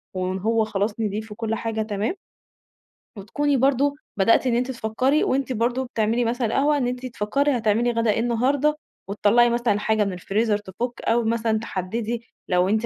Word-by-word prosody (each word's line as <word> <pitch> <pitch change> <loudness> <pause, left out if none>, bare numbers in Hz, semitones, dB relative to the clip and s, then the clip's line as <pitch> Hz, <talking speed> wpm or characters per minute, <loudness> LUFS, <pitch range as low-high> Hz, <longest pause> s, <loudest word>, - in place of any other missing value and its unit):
وإن 185 0 -2
هو 220 +2 +1
خلاص 210 +1 -2
نضيف 215 0 -3
وكل 225 +1 -3
حاجة 225 -1 -3
تمام، 215 - -2 1.0
وتكوني 285 +8 0
برضه 275 +2 +2 0.2
بدأتِ 230 +6 +4
إن 240 - +2
أنتِ 250 +2 0
تفكّري 255 +5 +1
وأنتِ 265 0 0
برضه 240 +3 0
بتعملي 230 0 0
مثلًا 240 +1 0
القهوة 285 +6 +2
إن 250 -3 0
أنتِ 250 +1 -4
تفكّري 255 +4 0
هتعملي 230 +2 +1
غدا 230 -1 +1
إيه 210 - 0
النهارده 255 +6 +1 0.3
وتطلّعي 210 +4 +4
مثلًا 235 -3 +1
حاجة 215 0 +1
من 195 - -3
الفريزر 210 +4 0
تفُك 210 +5 -5
أو 235 +1 +1
مثلًا 225 -1 0
تحدّدي 225 +3 -4 0.2
لو 180 +1 +2
أنتِ 220 +2 +1
230 Hz, 170 wpm, -23 LUFS, 210-245 Hz, 1.0 s, بدأتِ